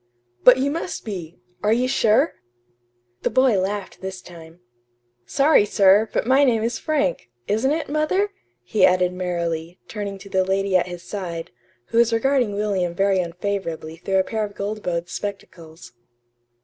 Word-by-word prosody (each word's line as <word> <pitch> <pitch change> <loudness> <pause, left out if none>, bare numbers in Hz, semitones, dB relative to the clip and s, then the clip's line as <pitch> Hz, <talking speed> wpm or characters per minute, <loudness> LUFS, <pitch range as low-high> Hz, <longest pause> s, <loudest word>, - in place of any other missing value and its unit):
"But 250 0 +8
you 275 +2 0
must 335 +3 -4
be! 180 -6 -6 0.2
Are 210 - +1
you 245 +3 +2
sure?" 255 +4 +3 0.9
The - - 0
boy 255 -6 +3
laughed 195 +1 -4
this 190 -1 -6
time. 165 -1 -14 0.7
"Sorry, 275 - +4
sir, 205 +1 +4
but - - -1
my 265 +3 +4
name 230 -5 +2
is 230 +1 -2
'Frank'; 285 - -1 0.2
isn't 220 +6 +1
it, 315 +1 -1
mother?" 310 +8 0 0.3
he 205 - 0
added 180 0 +4
merrily, 170 -2 -3
turning 200 -2 -5
to 200 +1 -13
the 190 -1 +2
lady 195 0 0
at 185 - +3
his 175 -1 -8
side, 180 -3 -6 0.4
who 230 - +2
was 235 -1 +4
regarding 240 -2 +1
William 195 -4 -1
very 195 0 +2
unfavorably 170 -2 -4
through 190 +3 -1
a 190 - +4
pair 220 +2 -2
of 205 -1 -6
gold 210 +2 -4
bowed 170 -2 -2
spectacles. 175 - -8
200 Hz, 160 wpm, -22 LUFS, 180-230 Hz, 0.9 s, But